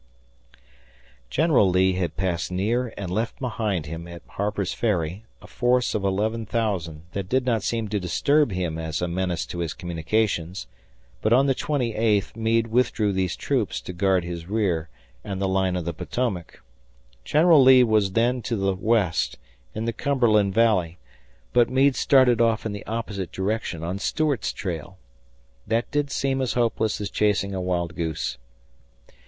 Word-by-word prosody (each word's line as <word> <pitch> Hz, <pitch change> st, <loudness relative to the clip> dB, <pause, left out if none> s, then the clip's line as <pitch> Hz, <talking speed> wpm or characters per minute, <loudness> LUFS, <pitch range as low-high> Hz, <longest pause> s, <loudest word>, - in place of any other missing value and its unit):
General 140 Hz, -, +3 dB
Lee 95 Hz, +1 st, +3 dB
had 85 Hz, -3 st, -2 dB
passed 85 Hz, -2 st, -1 dB
near 115 Hz, +6 st, 0 dB
and 95 Hz, -3 st, -5 dB
left 110 Hz, +5 st, -2 dB
behind 110 Hz, -, -2 dB
him 80 Hz, +3 st, -7 dB
at 85 Hz, 0 st, -10 dB
Harper's 100 Hz, -2 st, -2 dB
Ferry 95 Hz, -2 st, -1 dB, 0.2 s
a -, -, -11 dB
force 125 Hz, 0 st, +1 dB
of 105 Hz, -, -1 dB
11,000 105 Hz, -5 st, -1 dB
that 95 Hz, -1 st, -4 dB
did 130 Hz, 0 st, +1 dB
not 115 Hz, -4 st, +1 dB
seem 115 Hz, +1 st, -2 dB
to 105 Hz, 0 st, -1 dB
disturb 130 Hz, -, +2 dB
him 90 Hz, -4 st, -2 dB
as 80 Hz, -1 st, -3 dB
a 90 Hz, -, -1 dB
menace 90 Hz, 0 st, -2 dB
to 85 Hz, -, -7 dB
his 85 Hz, -2 st, -3 dB
communications, 90 Hz, +1 st, -1 dB, 0.6 s
but 110 Hz, -, +1 dB
on 130 Hz, +3 st, +5 dB
the 135 Hz, -, +3 dB
twenty 130 Hz, -4 st, -1 dB
eighth 105 Hz, -2 st, +1 dB
Meade 115 Hz, 0 st, +1 dB
withdrew 115 Hz, -3 st, +1 dB
these 95 Hz, -2 st, -1 dB
troops -, -, -1 dB
to 90 Hz, -, -8 dB
guard 95 Hz, 0 st, +2 dB
his 85 Hz, -1 st, -6 dB
rear 95 Hz, -6 st, 0 dB, 0.3 s
and 95 Hz, -1 st, -4 dB
the 100 Hz, -, 0 dB
line 95 Hz, -1 st, +1 dB
of 90 Hz, -3 st, -3 dB
the 85 Hz, -, -2 dB
Potomac. 100 Hz, 0 st, -4 dB, 0.6 s
General 155 Hz, -, +5 dB
Lee 130 Hz, -1 st, +8 dB
was 105 Hz, -4 st, +2 dB
then 120 Hz, +3 st, +2 dB
to 115 Hz, -, -2 dB
the 95 Hz, -2 st, 0 dB
west, 95 Hz, -4 st, +1 dB, 0.4 s
in 110 Hz, +1 st, -3 dB
the 115 Hz, -, -1 dB
Cumberland 110 Hz, -6 st, +2 dB
Valley, 95 Hz, -7 st, +2 dB, 0.6 s
but 120 Hz, -1 st, +4 dB
Meade 135 Hz, +1 st, +3 dB
started 125 Hz, -4 st, +4 dB
off 115 Hz, -2 st, +2 dB
in 110 Hz, -, -2 dB
the 105 Hz, +1 st, -7 dB
opposite 105 Hz, -5 st, -4 dB
direction 95 Hz, -4 st, -2 dB
on 90 Hz, +4 st, -3 dB
Stuart's 150 Hz, +3 st, 0 dB
trail. 90 Hz, -2 st, -5 dB, 0.7 s
That 115 Hz, +1 st, 0 dB
did 145 Hz, -1 st, 0 dB
seem 135 Hz, -1 st, -1 dB
as 130 Hz, -, 0 dB
hopeless 115 Hz, -3 st, 0 dB
as 105 Hz, -, -4 dB
chasing 100 Hz, -2 st, +1 dB
a 95 Hz, -, -2 dB
wild 85 Hz, -1 st, -2 dB
goose. 80 Hz, -7 st, -3 dB
105 Hz, 165 wpm, -24 LUFS, 90-115 Hz, 0.7 s, Lee